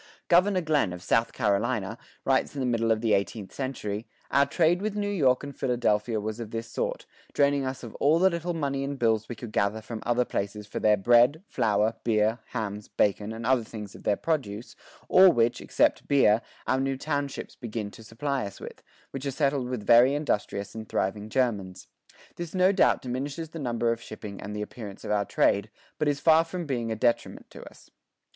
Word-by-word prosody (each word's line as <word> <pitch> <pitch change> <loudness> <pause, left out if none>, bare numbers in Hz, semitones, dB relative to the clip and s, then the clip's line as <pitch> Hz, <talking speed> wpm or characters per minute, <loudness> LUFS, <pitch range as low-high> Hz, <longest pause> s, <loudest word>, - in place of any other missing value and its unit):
Governor 185 +2 +4
Glenn, 150 - +1
of 90 0 -9
South 115 +4 +2
Carolina, 110 -1 0 0.3
writes 135 +2 +1
in - - -4
the 130 - 0
middle 115 -2 +1
of 110 -1 +1
the 115 -2 +2
eighteenth 100 0 -2
century: 115 -5 -4 0.2
"Our 140 0 +4
trade 170 +4 +2
with 210 0 -2
New 205 -1 -1
York 135 -10 +2
and 140 0 -7
Philadelphia 120 -3 0
was 110 +2 -4
of 115 -3 -6
this 115 +1 -4
sort, 120 - -3 0.3
draining 140 -1 +2
us 130 0 -5
of 115 - -8
all 150 +3 +4
the 190 +2 +4
little 170 +1 -3
money 140 -3 -1
and 140 0 -4
bills 110 -3 +1
we 120 - -4
could 115 0 -8
gather 100 +1 0
from 110 0 -7
other 120 +1 +1
places 105 0 -3
for 105 - -5
their 105 -1 +4
bread, 120 - +4
flour, 110 -1 +1
beer, 110 0 +2
hams, 105 -3 -4
bacon, 105 +1 0
and 115 +1 -6
other 130 -1 +3
things 105 -3 -8
of - - -12
their 105 - +1
produce, 120 -7 -3 0.3
all 190 0 +8
which, 120 -2 +1
except - - +1
beer, 115 -6 +4 0.2
our 130 - +1
new 135 0 -1
townships 145 -1 -3
begin 110 -3 -5
to 115 - -13
supply 135 +5 -2
us 100 - -11
with, - - -10 0.3
which 135 +1 -5
are - - +1
settled 135 -2 0
with 120 -5 -4
very 120 +5 +6
industrious 105 -8 -2
and 110 -1 -8
thriving 105 +3 -2
Germans. 100 -8 -1 0.5
This 175 +1 -6
no 185 +1 +5
doubt 195 - +3
diminishes 140 +6 -4
the 165 - -8
number 120 -3 0
of 115 0 -3
shipping 100 -3 -8
and 105 +1 -6
the 105 - -2
appearance 105 -3 -9
of - - -4
our 105 -1 +1
trade, - - +2 0.3
but 150 - +1
it - - +4
is 140 - -4
far 160 +1 +5
from 175 +1 -5
being 120 -5 -2
a - - -1
detriment 120 +1 -1
to - - -11
us." - - -20
120 Hz, 205 wpm, -27 LUFS, 105-140 Hz, 0.5 s, all